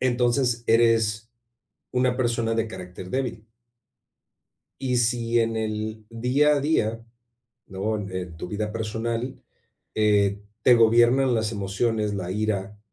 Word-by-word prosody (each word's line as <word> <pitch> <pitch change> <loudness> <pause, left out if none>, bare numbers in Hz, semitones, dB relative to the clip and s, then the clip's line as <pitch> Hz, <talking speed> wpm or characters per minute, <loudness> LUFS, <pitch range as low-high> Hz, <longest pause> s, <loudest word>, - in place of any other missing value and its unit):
entonces 120 -1 +1
eres 115 -1 +2 0.6
una 125 0 +1
persona 115 -2 0
de 115 0 0
carácter 90 -2 -9
débil 125 -5 -3 1.4
y 130 -2 0
si 120 0 +1
en 115 0 0
el 110 0 -3
día 125 +6 +2
a 145 - 0
día, 115 -7 0 0.7
¿no?, 100 +3 -2
en 95 -4 -6
tu 80 - -6
vida 105 +2 -3
personal, 115 +3 -3 0.6
eh, 105 -2 +2 0.2
te 125 - +7
gobiernan 120 +3 +4
las 110 0 0
emociones, 105 +1 -1
la 90 -2 -4
ira, 105 -1 -2
115 Hz, 120 wpm, -25 LUFS, 105-120 Hz, 1.4 s, te